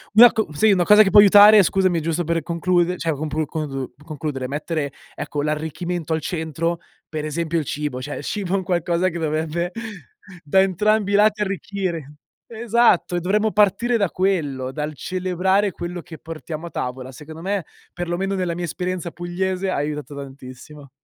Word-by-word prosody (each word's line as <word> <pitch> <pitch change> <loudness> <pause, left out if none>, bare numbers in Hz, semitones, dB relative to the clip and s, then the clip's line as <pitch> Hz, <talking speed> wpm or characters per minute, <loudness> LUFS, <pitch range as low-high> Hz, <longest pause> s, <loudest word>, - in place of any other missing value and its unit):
Una 240 +2 +9
co 220 -5 -1
sì, 210 +8 +4
una 180 -2 +3
cosa 210 +1 +8
che 195 - +1
può 205 - +7
aiutare, 205 +1 +9
scusami, 185 -2 +2
è - - -5
giusto 165 +2 -1
per 165 +1 0
conclude 175 +2 0
cioè 165 - -1
complu 155 +1 -2
congu 135 -3 -5
concludere, 150 -4 -4
mettere 150 +1 -3 0.2
ecco 145 - -4
l'arricchimento 160 +2 -3
al 160 - -1
centro, 165 0 -2 0.3
per 155 -1 -4
esempio 165 +2 -1
il 150 - -4
cibo. 145 -2 -3
Cioè 145 +3 -5
il - - -7
cibo 195 -3 -3
è 195 - +3
un 190 - -3
qualcosa 175 0 0
che 170 0 -6
dovrebbe 160 +3 -2 0.7
da 190 +6 +4
entrambi 205 +2 +1
i - - +4
lati 210 +1 +3
arricchire. 190 -6 -3 0.4
Esatto, 230 -5 +2
e - - +1
dovremmo 210 +5 +1
partire 210 +4 +2
da 200 -5 +1
quello, 145 -9 -1
dal 150 +2 -4
celebrare 185 +3 0
quello 175 +1 -6
che 160 -1 -11
portiamo 160 0 -7
a - - -8
tavola, 130 -1 -5
secondo 155 +5 -11
me, 195 -1 -2 0.3
per 175 0 -4
lo 175 - -1
meno 195 +2 -2
nella 180 -3 -1
mia 175 - -4
esperienza 180 +1 -3
pugliese, 185 +2 -2
ha - - -1
aiutato 145 0 -4
tantissimo. 140 +1 -10
170 Hz, 185 wpm, -22 LUFS, 155-190 Hz, 0.7 s, Una